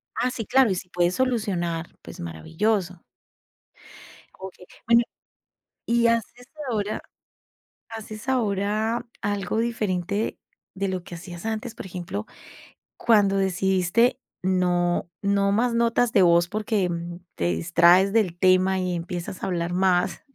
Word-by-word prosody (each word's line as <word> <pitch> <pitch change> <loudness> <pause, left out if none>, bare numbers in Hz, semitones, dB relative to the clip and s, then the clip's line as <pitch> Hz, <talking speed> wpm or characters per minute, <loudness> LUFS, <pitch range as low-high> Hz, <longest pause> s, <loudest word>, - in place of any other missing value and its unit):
Ah, 250 - +1
sí, 225 -4 -5
claro, 265 -4 +4
y 190 - +1
si 180 0 -6
puedes 175 0 +1
solucionar, 185 -10 -1
pues - - -11
maravilloso. 170 - -2 1.4
Okey, 190 -1 -10 0.2
bueno 235 0 +6 0.8
¿y 235 0 +3
haces 230 +2 -1 0.2
ahora 210 -1 -2 0.9
haces 220 +1 -8
ahora 220 0 0 0.2
algo 205 0 -1
diferente 210 -3 -1 0.4
de 195 0 -2
lo 185 -2 -3
que 175 - -9
hacías 175 +3 -8
antes? 220 +1 -3
Por - - -8
ejemplo, 175 - -5 0.7
cuando 205 -4 +3
decidiste 190 +5 +2 0.2
no 175 -2 +1
no 200 0 +2
más 235 +2 +1
notas 235 0 +2
de 190 - +5
voz 170 0 +4
porque 210 -3 0 0.5
te 85 - -1
distraes 175 - +4
del 185 -6 +1
tema 185 +1 +4
y 180 -1 -1
empiezas 175 +1 -5
a - - -1
hablar 175 -2 -2
más, 185 0 +1
195 Hz, 125 wpm, -24 LUFS, 180-220 Hz, 1.4 s, bueno